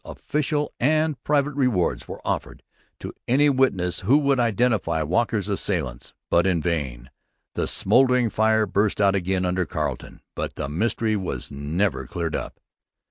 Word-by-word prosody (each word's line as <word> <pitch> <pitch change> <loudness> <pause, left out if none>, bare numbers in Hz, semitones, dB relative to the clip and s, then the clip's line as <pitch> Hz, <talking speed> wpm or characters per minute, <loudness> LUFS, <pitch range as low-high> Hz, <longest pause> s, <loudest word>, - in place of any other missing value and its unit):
Official 150 0 -2
and 155 0 +1
private 145 0 +1
rewards 125 -10 0
were - - -9
offered - - -3 0.4
to - - -6
any 145 +4 +4
witnesses 100 -10 +1
who 125 +10 +4
would 140 -3 +2
identify 110 -8 +1
Walker's 105 +5 0
assailants. 60 -2 -2 0.2
But 85 +2 +4
in 90 -3 +2
vain. 70 -7 -3 0.4
The - - -1
smouldering 125 -3 +3
fire 110 0 +3
burst 100 +1 0
out 100 -2 +4
again 95 -1 0
under 90 +1 0
Carleton. - - -4
But - - -4
the - - -4
mystery 110 +7 0
was 90 -11 -4
never 70 -1 -1
cleared 85 +1 -3
up. - - -5
105 Hz, 145 wpm, -24 LUFS, 85-125 Hz, 0.4 s, any